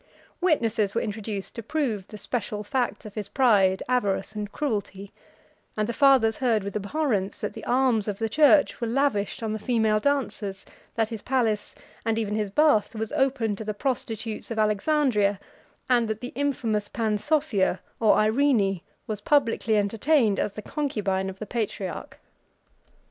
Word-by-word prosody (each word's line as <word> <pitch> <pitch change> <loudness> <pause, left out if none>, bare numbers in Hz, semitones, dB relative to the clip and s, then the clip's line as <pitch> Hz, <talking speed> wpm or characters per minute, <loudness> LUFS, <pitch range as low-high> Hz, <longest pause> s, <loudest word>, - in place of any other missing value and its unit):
Witnesses 230 - +1
were 230 - +2
introduced 210 -2 -4
to 230 - -6
prove 230 -7 -2
the 215 - -9
special 210 0 -3
facts 240 +2 -2
of 210 - -9
his 205 -2 -5
pride, 200 -8 +3
avarice, 230 -5 0
and 210 -1 -5
cruelty; 205 -8 -3 0.7
and 215 0 0
the 235 - -2
fathers 260 -4 +4
heard 230 -6 +1
with 200 +1 -6
abhorrence, 210 -2 -1
that - - -3
the - - -9
alms 245 -4 +2
of 205 -2 -2
the 225 - -1
church 295 +4 +4
were 235 - 0
lavished 235 -4 0
on 220 -1 -1
the 220 - -3
female 220 -2 +2
dancers, 210 -7 -2 0.3
that 225 -1 +1
his 225 -3 -6
palace, 230 -5 0 0.3
and 225 0 0
even 215 -2 -1
his 210 -1 -1
bath, 235 -2 +3
was 220 0 -4
open 260 -6 +1
to 220 - -7
the 215 -1 -4
prostitutes 225 -3 -3
of 230 - -4
Alexandria, 215 -1 +2 0.5
and 240 -3 +3
that 220 0 -3
the 245 +2 -7
infamous 230 -7 -1
Pansophia, 220 - 0 0.2
or 220 -2 +5
Irene, 215 -5 +2 0.2
was 210 -2 -4
publicly 230 -5 +2
entertained 220 +2 +2
as 205 - -1
the 215 - -8
concubine 200 -10 -1
of 190 - -8
the 215 - -6
patriarch. 205 -6 -4
220 Hz, 160 wpm, -26 LUFS, 205-255 Hz, 0.7 s, or